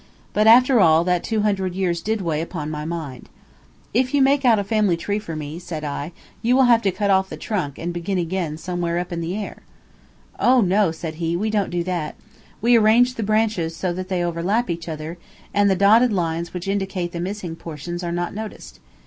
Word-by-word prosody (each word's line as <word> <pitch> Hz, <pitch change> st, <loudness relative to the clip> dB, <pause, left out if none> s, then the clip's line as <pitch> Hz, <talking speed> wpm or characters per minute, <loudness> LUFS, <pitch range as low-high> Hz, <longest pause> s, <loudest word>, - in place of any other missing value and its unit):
But, 215 Hz, +1 st, +3 dB
after 250 Hz, +2 st, +7 dB
all, 160 Hz, -3 st, +5 dB
that 180 Hz, -1 st, +1 dB
two 220 Hz, -2 st, 0 dB
hundred 190 Hz, -3 st, 0 dB
years 175 Hz, -3 st, -1 dB
did 220 Hz, +3 st, -1 dB
weigh 160 Hz, -3 st, -1 dB
upon 160 Hz, -2 st, -5 dB
my 150 Hz, 0 st, -4 dB
mind. 155 Hz, -7 st, -6 dB, 0.6 s
"If 255 Hz, +4 st, +1 dB
you 280 Hz, -, +4 dB
make 275 Hz, +1 st, +3 dB
a 225 Hz, -5 st, +4 dB
family 205 Hz, -4 st, +1 dB
tree 205 Hz, +5 st, -2 dB
for 165 Hz, -6 st, -7 dB
me," 155 Hz, +2 st, -6 dB
said 165 Hz, -3 st, -6 dB
I, 145 Hz, +2 st, -4 dB, 0.3 s
"you 240 Hz, +2 st, +3 dB
will 265 Hz, -, +5 dB
have 235 Hz, -2 st, +5 dB
to 195 Hz, -, +1 dB
cut 200 Hz, +2 st, 0 dB
off 190 Hz, 0 st, +2 dB
the -, -, -7 dB
trunk 170 Hz, -11 st, -3 dB
and 175 Hz, +1 st, -4 dB
begin 180 Hz, +3 st, -2 dB
again 170 Hz, -3 st, -2 dB
somewhere 175 Hz, 0 st, -2 dB
up 180 Hz, 0 st, -3 dB
in 170 Hz, -, -3 dB
the 170 Hz, +3 st, -3 dB
air." 210 Hz, -, -5 dB, 0.8 s
"Oh, 255 Hz, +1 st, +5 dB
no," 200 Hz, -2 st, +3 dB
said 160 Hz, -1 st, -6 dB
he, 165 Hz, +1 st, 0 dB
"we 215 Hz, +4 st, -1 dB
don't 205 Hz, -3 st, 0 dB
do 175 Hz, -1 st, -1 dB
that. 170 Hz, -4 st, -3 dB, 0.5 s
We 240 Hz, +1 st, +5 dB
arrange 230 Hz, +3 st, +4 dB
the 230 Hz, -, -5 dB
branches 215 Hz, -6 st, 0 dB
so 180 Hz, +1 st, -2 dB
that 185 Hz, +1 st, -5 dB
they 180 Hz, -2 st, 0 dB
overlap 175 Hz, +6 st, 0 dB
each 170 Hz, 0 st, -5 dB
other, 160 Hz, +2 st, -6 dB, 0.3 s
and 205 Hz, 0 st, +3 dB
the 190 Hz, -, +3 dB
dotted 220 Hz, +6 st, +5 dB
lines 170 Hz, -3 st, -1 dB
which 180 Hz, +1 st, -6 dB
indicate 195 Hz, -3 st, -2 dB
the 170 Hz, -, -5 dB
missing 180 Hz, -2 st, -4 dB
portions 170 Hz, +2 st, -7 dB
are 170 Hz, -, -2 dB
not 175 Hz, 0 st, -2 dB
noticed. 215 Hz, +1 st, -8 dB
180 Hz, 215 wpm, -22 LUFS, 170-215 Hz, 0.8 s, after